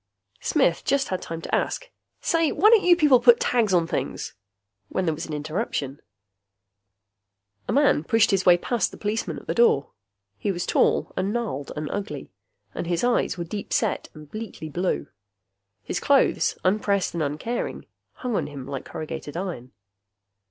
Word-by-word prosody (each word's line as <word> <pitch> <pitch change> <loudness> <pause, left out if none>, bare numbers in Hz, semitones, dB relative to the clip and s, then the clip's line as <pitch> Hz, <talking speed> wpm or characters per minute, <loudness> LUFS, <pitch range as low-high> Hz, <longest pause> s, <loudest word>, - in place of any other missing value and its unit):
Smith - - +2
just 275 0 +1
had 185 -1 -2
time 165 0 -6
to - - -7
ask, - - -1 0.3
"Say, 330 -2 +2
why 420 +8 +5
don't 450 -3 +6
you 355 -1 +6
people 295 -7 +5
put 240 0 +6
tags 230 -5 +2
on 175 -2 +3
things?" - - -3 0.6
when 185 - -1
there 160 - +1
was 160 +3 -6
an 155 - -6
interruption. 150 - -3 1.7
A - - -1
man 280 - +3
pushed 225 +6 +3
his 195 -2 +2
way 175 -1 +6
past 235 +6 0
the - - -12
policeman 215 +2 -2
at - - -10
the - - -1
door. 230 -12 +3 0.5
He 205 - 0
was 175 -2 -3
tall - - +2
and 190 +2 -1
gnarled 215 - -3
and 150 0 -3
ugly, 150 - -5 0.4
and - - -4
his 175 +3 0
eyes 245 -6 +1
were 170 - -2
deep 200 +5 -6
set 220 -4 0
and 155 -1 -11
bleakly 215 -4 -7
blue. 180 +5 -1 0.8
His - - -3
clothes, - - +3
unpressed 200 0 +1
and 170 - -2
uncaring, 155 +12 -3 0.3
hung 250 -3 -3
on - - 0
him 140 -3 -8
like 135 -1 -5
corrugated 155 -1 -6
iron. 170 -10 -5
190 Hz, 170 wpm, -25 LUFS, 155-235 Hz, 1.7 s, don't